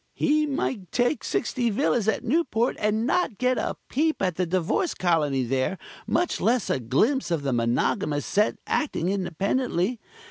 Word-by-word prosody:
He 305 0 +2
might 235 - -3
take 245 +4 +1
sixty 240 -3 -1
villas 230 -1 +1
at 220 - +1
Newport 250 -3 +1
and 215 +2 +1
not 275 - 0
get 255 0 +1
a - - -2
peep 310 +4 0
at 185 -2 0
the 180 +1 -1
Divorce 185 - 0
Colony 150 -7 +1
there, 130 +9 -1 0.3
much 350 - 0
less 235 -3 +1
a - - +1
glimpse 175 - +1
of 165 -4 -1
the 135 -2 0
monogamous 145 - 0
set 210 +2 +1
acting 225 - -1
independently. 195 +3 -1
210 Hz, 155 wpm, -25 LUFS, 170-255 Hz, 0.3 s, He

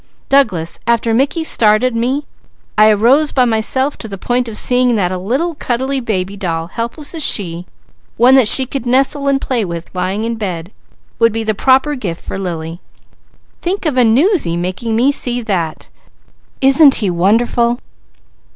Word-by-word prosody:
Douglas, 200 -13 +1
after 235 -1 +1
Mickey 275 +7 0
started 230 -3 +2
me 260 +5 -1 0.5
I 215 0 +5
arose 245 +9 +3
by 255 -2 +2
myself 245 +5 0
to 225 - -7
the 200 -2 -8
point 245 +5 -2
of 220 -2 -6
seeing 250 -1 +2
that 185 -4 0
a 185 - -3
little 265 - -2
cuddly 265 0 -2
baby 200 -5 -3
doll, 165 -5 -3
helpless 235 - -5
as 325 -2 0
she, 175 -6 +1 0.5
one 245 +3 +5
that 260 -5 +5
she 260 +4 +6
could 255 -1 -6
nestle, 275 +3 +1
and 275 -1 +2
play 250 -4 -2
with 170 -2 -7
lying 185 +3 -3
in 230 0 -3
bed 180 -4 -5 0.5
would 230 0 +4
be 225 +1 -3
the 215 0 -1
proper 265 +7 +2
gift 190 - -6
for - - -5
Lily. 170 -2 -6 0.8
Think 365 +2 -3
of 300 -4 0
a 250 - +4
'newsy' 240 - +2
making 185 +6 -3
me 250 +5 +3
see 245 -3 -3
that! 175 -7 -3 0.7
Isn't 275 +1 +6
he 200 -5 0
wonderful?" 235 +6 +1
230 Hz, 170 wpm, -15 LUFS, 195-265 Hz, 0.8 s, she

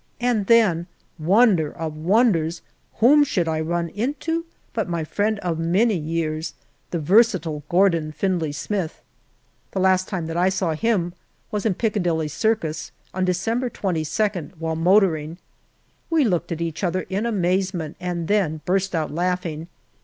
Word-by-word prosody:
And 235 -5 +1
then, 195 -8 +4 0.3
wonder 185 -2 +4
of 160 -2 -5
wonders, 170 -2 +2 0.3
whom 285 +6 +6
should 180 -11 0
I 160 -1 0
run 170 +1 -1
into 295 - -2 0.3
but 220 -5 -2
my 170 -2 -1
friend 210 +7 0
of 170 -3 -2
many 190 +8 +2
years, 160 -1 -2 0.3
the 175 - -2
versatile 170 -3 +3
Gordon 170 -4 +3
Findlay 170 -1 -1
Smith. 165 +4 -4 0.7
The 195 - -1
last 185 0 +3
time 175 -4 -3
that 165 +1 -4
I 180 +2 +3
saw 185 -3 0
him 175 -1 0 0.4
was 210 +1 -1
in 195 - 0
Piccadilly 175 -8 0
Circus 165 -3 -1 0.2
on 185 0 0
December 225 +8 0
22nd, 185 -2 -2
while 160 0 -2
motoring. 165 -2 +2 0.7
We 320 -4 +3
looked 180 -5 0
at 165 0 -3
each 165 +2 -3
other 185 0 0
in 200 +5 -1
amazement, 185 -5 -1
and 175 -2 -3
then 175 -7 +1
burst 190 +1 0
out 155 -2 -1
laughing. 175 -2 -2
180 Hz, 145 wpm, -23 LUFS, 160-205 Hz, 0.7 s, whom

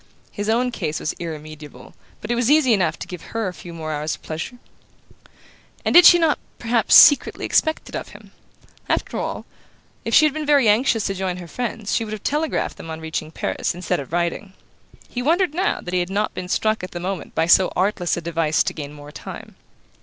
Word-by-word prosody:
His 205 +1 -4
own 245 +3 +1
case 155 -9 -3
was 155 - -2
irremediable, 155 -2 -9 0.3
but - - -4
it - - +1
was 240 +1 +1
easy 290 -5 +5
enough 185 -6 +1
to - - -8
give 180 -2 -8 0.2
her 225 -3 0
a 185 - -4
few 175 - -11
more 160 -2 -5
hours 150 +1 -2
of - - -22
pleasure. 160 +10 -6 1.3
And - - +1
did 350 0 +10
she 350 - +8
not 325 -3 +2 0.2
perhaps 230 -1 +2
secretly 290 - +6
expect 315 0 +1
it - - -8
of - - -4
him? - - -15 0.6
After - - -1
all, - - -4 0.6
if - - 0
she 310 - +7
had 300 - +2
been 310 0 -3
very 285 -5 +4
anxious 220 0 +3
to 195 - -1
join 185 -1 -3
her 175 -1 -9
friends 225 +1 -4
she - - +1
would 215 -1 -6
have 215 - -7
telegraphed 300 +2 -1
them 165 - -9
on 160 0 -6
reaching 160 -1 -4
Paris, 160 - -3
instead 180 -4 -2
of 140 -1 -8
writing. 175 +3 -2 0.5
He 245 - -5
wondered 335 +4 +2
now 375 +5 0
that 180 - -7
he 180 - +2
had 175 0 -2
not 205 +2 -1
been 180 0 -6
struck 215 +1 0
at 185 - -7
the 175 - -4
moment 185 +1 -5
by 160 - +2
so 180 +2 +5
artless 185 -3 0
a - - -3
device 165 -2 +1
to - - -3
gain 145 -2 -7
more 145 0 -12
time. - - -10
190 Hz, 220 wpm, -21 LUFS, 165-245 Hz, 1.3 s, did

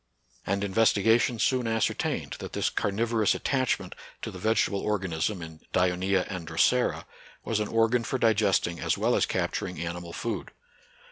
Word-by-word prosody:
And 100 +1 0
investigation 115 +3 +3
soon 125 +1 +1
ascertained 115 -1 -1
that - - -7
this - - 0
carnivo 115 +3 -1
rous 105 - +3
attachment 130 -2 -1 0.3
to - - -4
the 90 - -9
vegetable 110 -1 +1
organism 95 -2 -1
in 80 -1 -10
Dioncea 90 +1 +2
and 90 -4 -6
Drosera 120 +10 +2 0.4
was 110 - 0
an 105 - -1
organ 115 +2 +2
for 130 - -2
digesting 105 -7 +2
as - - 0
well - - +2
as - - +2
capturing 90 -3 -2
animal 85 0 -5
food. 115 +6 -4
100 Hz, 150 wpm, -27 LUFS, 90-115 Hz, 0.4 s, investigation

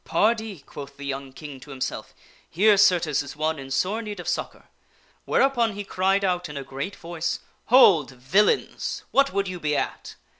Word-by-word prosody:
" - - -44
Pardee! 220 -5 +1
" - - -35
quoth 145 -1 -10
the 140 - -8
young 135 -1 -4
King 140 0 -9
to 135 - -14
himself, 135 -2 -5 0.2
" - - -30
here, 205 +5 +4
certes, 175 -7 +3
is 140 0 -8
one 155 0 -1
in 135 0 -8
sore 185 +12 0
need 210 -3 -7
of 175 - -7
succor." - - -3 0.6
Whereupon 240 -5 +2
he 205 +1 -5
cried 195 +1 +1
out 180 -3 -1
in 150 - -7
a 140 - -4
great 135 +8 -5
voice, 170 0 -3 0.3
"Hold, 195 - +6
villains! 135 +11 0
What 275 0 +3
would 200 0 -1
you 180 -1 -5
be 150 -2 0
at - - -4
175 Hz, 195 wpm, -25 LUFS, 140-205 Hz, 0.6 s, Hold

